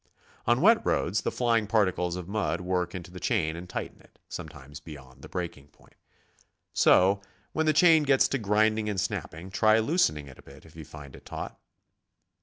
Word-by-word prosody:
On 120 +3 +3
wet 225 +5 +5
roads 95 +6 0
the - - -2
flying 115 -3 +1
particles 95 -5 +1
of 90 -2 -6
mud 100 -4 -1
work 90 -1 -2
into 90 0 -8
the 90 - -9
chain 80 -2 0
and 90 +1 -9
tighten - - -6
it, - - -24
sometimes 70 +1 -9
beyoiivd 70 -4 -12
the - - -11
breaking 85 -6 -5
point. 75 - -25 0.8
So 100 +2 +4 0.3
when 160 0 0
the - - +6
chain 160 0 +6
gets 135 -2 +3
to 140 - -1
grinding 110 +1 +1
and 100 -3 -2
snapping, 90 +1 -4
try 110 +2 +4
loosening 110 - +1
it 65 - -14
a - - -12
bit - - -16
if 80 - -17
you 80 -2 -9
find 75 -3 -11
it - - -15
taut. - - -6
95 Hz, 190 wpm, -27 LUFS, 80-110 Hz, 0.8 s, the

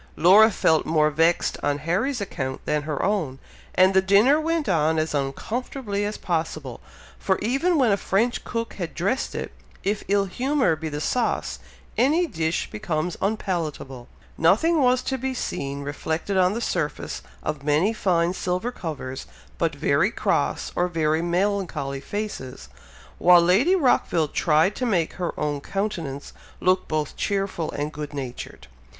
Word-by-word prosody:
Laura 200 +7 +7
felt 160 -6 +2
more 155 -1 +2
vexed 165 +3 +2
on 145 0 0
Harry's 195 - -1
account 130 -9 -4
than 150 0 0
her 150 -1 -3
own, 180 -10 -1 0.4
and 185 +1 +5
the 190 - +5
dinner 210 +11 +4
went 325 -1 -1
on 160 -3 +2
as 155 0 0
uncomfortably 205 - -3
as 210 +1 -3
possible; 160 - -3 0.4
for 190 - +1
even 275 - +1
when 250 -6 +4
a 200 - +3
French 225 +5 0
cook 230 -1 -4
has 175 -4 -4
dressed 200 +11 -1
it, - - -4 0.3
if 205 +1 -1
ill 200 0 +2
humour 255 - +1
be 160 +1 -5
the 145 0 -4
sauce, 235 +9 -1 0.4
any 310 +8 +3
dish 165 - -2
becomes 175 -5 -2
unpalatable. 165 - -3 0.3
Nothing 255 - +4
was 255 -1 +3
to 265 -1 -2
be 260 +1 -2
seen 140 - -3
reflected 160 +6 -3
on 185 0 +3
the 230 - -3
surface 165 -9 -2 0.2
of 145 - -3
many 155 +9 +2
fine 175 -5 +1
silver 185 +6 -2
covers, 140 - -6 0.3
but 165 -3 0
very 145 +6 +2
cross, - - -1
or 175 - +2
very 160 -2 0
melancholy 175 -6 -1
faces; 205 -10 -6 0.5
while 175 0 +7
Lady 195 - +4
Rockville 210 - +2
tried 160 +7 +2
to 255 - -1
make 175 -7 +1
her 175 - -3
own 145 -1 -1
countenance 165 -8 -4 0.3
look 185 0 +2
both 155 -2 -2
cheerful 195 -5 -1
and 150 +2 -3
good 150 -1 -6
natured. 130 -3 -7
180 Hz, 155 wpm, -24 LUFS, 155-215 Hz, 0.5 s, Laura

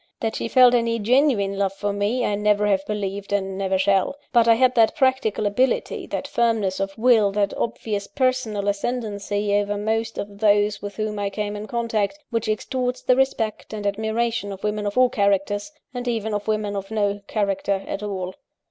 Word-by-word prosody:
That 225 -1 -2
she - - -2
felt 250 0 +6
any 230 -1 +2
genuine 225 -4 +2
love 195 -1 +1
for 205 +1 -2
me 210 +5 0
I 210 - 0
never 210 0 +2
have 195 -2 +2
believed, 200 -1 -4
and 195 -1 -1
never 190 -1 0
shall: 195 +5 +2 0.2
but 235 -2 +5
I 230 - +7
had 255 +1 +3
that 230 +1 +4
practical 260 -7 +1
ability, 250 +6 0
that - - -4
firmness 225 -5 +1
of 195 0 -3
will, 225 -3 +4
that 200 -1 +1
obvious 210 -3 -3
personal 255 -7 -1
ascendancy 205 -1 -2
over 205 0 +1
most 225 +2 -1
of 200 0 -6
those 205 -1 +3
with 205 -1 -6
whom 215 0 -3
I 200 -1 -1
came 205 +1 -3
in 210 +1 -6
contact, 230 +1 -1
which 230 -2 -1
extorts 250 +4 -2
the 255 - +4
respect 240 -5 -1
and 210 -1 -5
admiration 220 +1 -1
of 195 -1 -9
women 210 0 -1
of 205 - -4
all 255 0 +6
characters, 205 +2 0 0.2
and 245 0 -5
even 220 -2 -1
of 205 0 -3
women 215 -1 -1
of 195 -1 -5
no 205 -2 -1
character 200 -2 -1
at 195 - -4
all. 190 -3 -4
210 Hz, 190 wpm, -23 LUFS, 200-230 Hz, 0.2 s, I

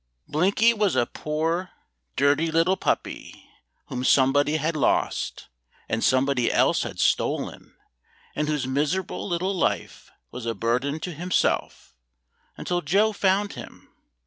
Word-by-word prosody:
Blinky 200 +9 +3
was 210 -4 +1
a 120 - +3
poor 165 +7 -2 0.5
dirty 145 +4 +2
little 165 +4 +3
puppy - - -3 0.4
whom 125 0 -5
somebody 145 +3 +3
had 155 +2 -1
lost, 150 - 0 0.4
and 110 0 -1
somebody 130 -1 +2
else - - +3
had - - -5
stolen, - - -1 0.6
and 150 - -1
whose 150 -4 -1
miserable 150 +10 -2
little 185 +2 -1
life 180 - -2 0.2
was 120 -1 -7
a 115 - -1
burden 125 +8 -1
to 180 - -4
himself 175 - -1 0.6
until 175 0 -2
Joe 200 +8 +2
found 200 +1 +1
him. 120 -3 -12
155 Hz, 125 wpm, -25 LUFS, 135-185 Hz, 0.6 s, Blinky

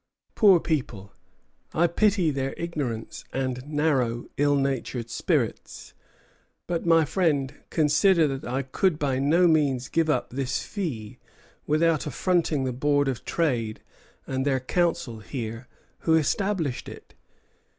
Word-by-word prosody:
Poor 195 -5 +6
people! 120 - -3 0.6
I 170 - +4
pity 185 -1 +2
their 135 -1 -3
ignorance 145 -10 -4
and 130 -1 -2
narrow, 140 -6 0
ill 145 0 +2
natured 135 -4 -2
spirits. - - -2 0.7
But, 175 -1 -3
my 165 -1 +5
friend, 145 -5 0 0.2
consider 160 +2 +3
that 135 -3 -4
I 135 +2 -1
could 160 +6 0
by 135 -4 0
no 165 +6 +4
means 140 -6 +2
give 165 -1 +1
up 125 -5 0
this 130 0 -2
fee 135 - -5 0.5
without 155 0 +2
affronting 165 -3 0
the 130 -1 -2
Board 145 +2 +1
of 130 -3 -3
Trade 120 -10 -1 0.4
and 130 0 -2
the 135 -1 +1
Council 165 -4 -1
here 115 +1 -6 0.3
who 160 - +2
established 160 -2 0
it." - - -13
145 Hz, 130 wpm, -26 LUFS, 130-165 Hz, 0.7 s, Poor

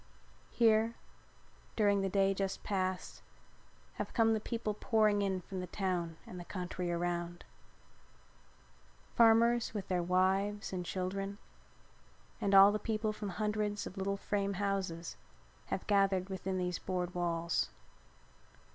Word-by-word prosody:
Here, 225 0 +3 0.8
during 205 -2 +3
the 195 - 0
day 195 0 +3
just 195 0 -3
passed, 185 -2 -2 0.8
have - - -5
come 225 -2 +4
the 220 - +1
people 220 -1 -3
pouring 215 -1 +2
in 190 -2 0
from 190 +2 -6
the 180 - -4
town 175 -3 -2
and 180 - -8
the - - -6
country 180 -1 -4
around. 175 0 -2 1.7
Farmers 230 0 +4
with 200 -3 -4
their 180 -1 +1
wives 190 +3 +1
and 180 -1 -2
children 195 +2 -3 1.0
and 200 -2 +2
all 195 +1 +9
the 210 - -1
people 215 -1 -1
from 210 -1 -5
the 195 - -5
hundreds 210 -1 -1
of - - -8
little 200 0 -1
frame 200 0 -1
houses 190 -4 -2 0.5
have 190 - -3
gathered 195 -2 +2
within 190 0 -3
these 180 -1 -1
board 180 -1 -3
walls. 170 -1 0
195 Hz, 135 wpm, -33 LUFS, 180-210 Hz, 1.7 s, all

